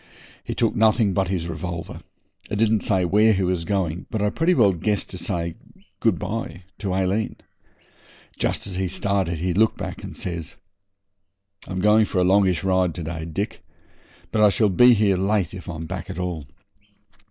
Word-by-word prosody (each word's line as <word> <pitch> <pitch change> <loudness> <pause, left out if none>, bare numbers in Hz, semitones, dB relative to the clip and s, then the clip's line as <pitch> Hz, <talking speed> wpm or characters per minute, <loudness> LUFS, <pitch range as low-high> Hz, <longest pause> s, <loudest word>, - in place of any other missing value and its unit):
He - - -5
took - - +1
nothing 110 -2 +3
but 95 +1 +1
his 90 -3 -2
revolver, 85 0 -5 0.5
and 105 - -2
didn't 110 0 +3
say 95 -3 +1
where 105 +5 +4
he 95 -1 0
was 90 -2 -1
going, 90 -3 -2
but 110 - -2
I 105 0 +1
pretty 170 +7 +2
well 105 -7 +5
guessed 100 +4 -1
to 95 - -6
say 85 -3 -2 0.5
good 115 - +2
bye 105 -4 -5 0.2
to 100 -3 -3
Aileen. 95 +3 0 1.0
Just - - -1
as 100 - -6
he 95 +1 -1
started 95 -2 -1
he 90 +3 -1
looked 110 +4 +3
back - - -6
and - - -8
says 85 -3 -5 1.1
'I'm 95 0 -3
going 105 +2 +5
for 100 - -4
a 90 - +4
longish 95 -3 +3
ride 95 -3 +1
to 85 - -5
day, 80 0 -5
Dick, 100 +6 -4 0.7
but 110 - +1
I 105 - +7
shall 105 +1 +2
be 125 +6 +6
here 100 -3 +2
late 95 -2 0
if 95 -2 -8
I'm 80 -1 -5
back 95 +1 -6
at 95 - -6
all. 90 -6 -4
95 Hz, 185 wpm, -23 LUFS, 90-105 Hz, 1.1 s, I